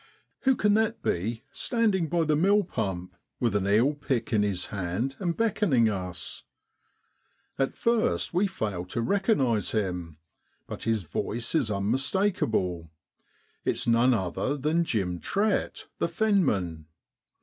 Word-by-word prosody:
Who 265 0 +5
can 210 -3 +2
that 220 +1 +1
be 110 +7 -1
standing 210 -8 +1
by 170 -1 +2
the 155 -1 +2 0.3
pump - - -24 0.4
mill, - - -35 0.2
with 115 -4 +1
an 100 -1 +1
eel 115 +8 +4
pick 135 -5 -2
in 105 - +4
his 100 -3 0
hand, 100 +8 -2
and 175 -3 -1
beckoning 190 - +2
us? 90 -4 -4 1.2
At 135 - 0
first 230 -5 +1
we 185 +4 +3
fail 105 - -3
to 105 +6 -3
recognise 140 - +1
him, 90 -7 -2 0.5
but - - -7
his 110 -3 +1
voice 115 +8 -3
is 145 -9 +2
unmis 105 +6 0
takeable 110 - 0 0.7
it's - - -1
none 120 +2 +4
other 110 +8 -1
than 155 +5 +1
Jim 90 - -1
Trett, 205 - -1
the - - +1
fenman. 150 - +1
120 Hz, 140 wpm, -27 LUFS, -, 1.2 s, Who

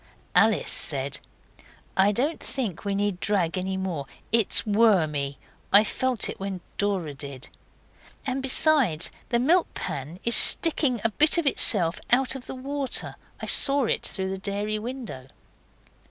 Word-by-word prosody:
Alice 220 -1 +3
said, 140 -3 +1 0.8
'I 195 +2 +3
don't 285 +9 -2
think 230 - -5
we 200 -1 -2
need 200 -2 -2
drag 185 -5 0
any 190 +1 -3
more. 175 -7 -4 0.2
It 230 -3 +1
is - - +5
wormy. 165 - +1 0.3
I 200 +2 +7
felt 255 +1 -1
it - - -8
when 195 -2 -6 0.2
Dora 190 -7 -1
did. 140 -2 -8 0.8
And 265 0 -3
besides, 265 - +2 0.2
the 235 - +1
milk 325 +9 +2
pan 145 +6 -6
is 235 0 +1
sticking 285 -8 +3
a 225 - 0
bit 305 - +4
of 340 - 0
itself 180 -10 +4
out 255 +2 +3
of 265 -2 -10
the - - -7
water. 275 +1 -2 0.3
I - - -5
saw 280 -1 +3
it - - -1
through 190 -1 -3
the 190 - -5
dairy 205 +2 -3
window. 230 - -8
205 Hz, 155 wpm, -24 LUFS, 180-255 Hz, 0.8 s, I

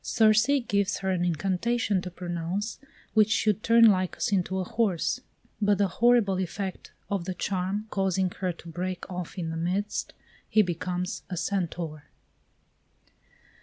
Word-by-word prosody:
Circe 220 +2 +4 0.2
gives 200 0 +1
her 190 - +2
an 180 -2 0
incantation 190 +5 0
to 180 - -5
pronounce, 180 +4 -4 0.3
which 215 -1 +5
should 215 -2 +2
turn 230 +1 +6
Lycus 185 -2 +2
into 190 -1 +1
a 190 - 0
horse; 190 -4 0 0.4
but 205 -1 +3
the 200 0 +3
horrible 215 -1 +3
effect 190 +1 -4 0.2
of 195 -4 -1
the 185 -1 -3
charm 190 +3 -2
causing 190 -1 +1
her 185 -2 -1
to 170 0 -13
break 180 +2 -4
off 180 +1 -5
in 165 -3 -3
the 165 - -4
midst, 190 +5 -2 0.4
he 215 - +5
becomes 180 +1 -3
a 180 - -4
Centaur. 165 -5 -3
190 Hz, 145 wpm, -27 LUFS, 180-205 Hz, 0.4 s, turn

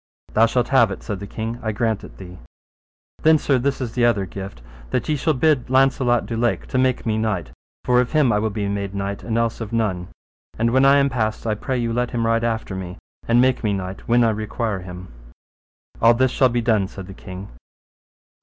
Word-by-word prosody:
Thou 115 +1 +5
shalt 120 +1 0
have 120 -5 +5
it, 95 - -7
said 100 -4 -4
the 100 - -7
king, 115 +3 -5
I 110 - -2
grant 110 -1 -1
it - - -12
thee. 90 -1 -11 0.8
Then, 160 0 +6
sir, 140 -3 +1
this 135 +2 -1
is 120 -4 -4
the 125 - 0
other 115 -5 +3
gift, 95 -9 -8 0.3
that - - -1
ye 155 - +1
shall 155 +2 0
bid 135 -2 +2
Launcelot 130 -2 +3
du 115 - -4
Lake 115 +1 0
to 130 - 0
make 130 -1 +1
me 110 -1 0
knight, 95 - -2 0.3
for 125 0 +4
of 125 - -3
him 150 -6 +3
I 105 - +2
will 110 +1 0
be 105 -1 -3
made 100 0 -3
knight 100 0 -3
and 115 -1 -2
else 115 0 -1
of 110 -1 -5
none. 100 -6 -1 0.5
And 115 +1 +1
when 130 +2 +4
I 140 +1 +6
am 140 0 +3
passed 110 -3 -2
I 110 - +1
pray 130 +5 -3
you 115 -1 -1
let 120 +1 0
him 115 -1 -1
ride 115 0 +1
after 110 -4 -2
me, 90 0 -6 0.3
and 115 +1 +4
make 130 0 +2
me 105 -2 +1
knight 95 -1 -5
when 120 +1 +4
I 115 - +3
require 110 -1 -3
him. 90 0 -9 0.9
All 115 +1 +6
this 130 +1 +2
shall 130 -1 +3
be 120 0 0
done, 110 -4 +2
said 95 0 -9
the 95 - -10
king. 95 +1 -9
115 Hz, 230 wpm, -22 LUFS, 100-125 Hz, 0.9 s, Then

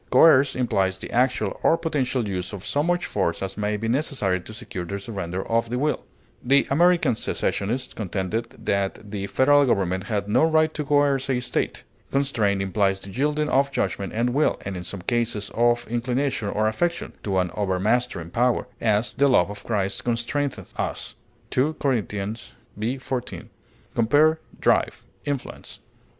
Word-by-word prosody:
Coerce 140 -4 +6
implies 95 -7 +1
the - - -8
actual 125 +2 +1
or 165 - +4
potential 135 -8 -1
use 90 0 -3
of 95 -2 -7
so 145 - 0
much 175 +3 +1
force 85 -3 -1
as 95 0 -4
may 105 0 -1
be 110 +2 -3
necessary 115 - 0
to 100 - -11
secure 110 -5 -6
the 100 +3 -4
surrender 95 -3 -5
of 115 0 +1
the 125 - -1
will; 150 +3 0 0.4
the 140 +3 +4
American 170 -2 +4
secessionists 115 +3 -2
contended 105 +3 -3
that 100 +1 -1
the 100 -2 -3
Federal 145 +6 +4
government 95 -4 +1
had 105 -3 -2
no 105 - +3
right 155 -1 +3
to 150 - -3
coerce 140 -2 +2
a 130 -2 +2
State. 125 - -2 0.3
Constrain 115 -8 +1
implies 95 0 +1
the 95 - -10
yielding 150 +5 0
of 140 +1 +2
judgment 100 -7 -2
and 120 +3 0
will, 150 +3 +2
and 100 -1 -4
in 90 - -4
some 90 +1 -7
cases 115 -2 -1
of 120 +1 +2
inclination 120 0 -1
or 110 +2 +1
affection, 170 +10 -1
to 95 -2 -1
an 90 -2 +1
overmastering 100 -2 0
power; 120 +2 +1
as, 110 0 +1
"the 140 - +3
love 100 -8 +4
of 105 - -9
Christ 100 -4 -1
constraineth 120 +4 -2
us," - - -3 0.4
2 145 +5 +1
Cor. 135 -6 +1 0.7
v, 115 +6 -2
14. 130 -1 -5 0.4
Compare 145 +7 +4 0.2
DRIVE; - - +2 0.2
INFLUENCE. 140 -3 -5
115 Hz, 165 wpm, -24 LUFS, 100-140 Hz, 0.7 s, Coerce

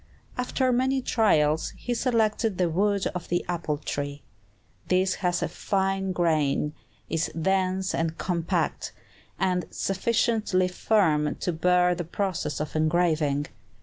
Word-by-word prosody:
After 255 +1 0
many 260 +2 +2
trials, 160 - +2
he 245 - -3
selected 225 -4 +1
the 175 -2 +1
wood 200 +3 +1
of 180 -2 -5
the 175 0 -1
apple 170 -4 -2
tree. 145 -1 -4 0.6
This 185 +1 +2
has 180 -1 +1
a - - 0
fine 195 -1 -1
grain, 155 -4 +1 0.3
is 165 0 -1
dense 190 +1 +1
and 165 0 -1
compact, 170 -2 -1 0.4
and 180 -1 0
sufficiently 210 -1 +1
firm 160 -7 +2
to 180 - 0
bear 180 +2 +3
the 175 0 -3
process 170 -4 -2
of 150 0 -4
engraving. 155 -3 +1
180 Hz, 125 wpm, -26 LUFS, 160-195 Hz, 0.6 s, bear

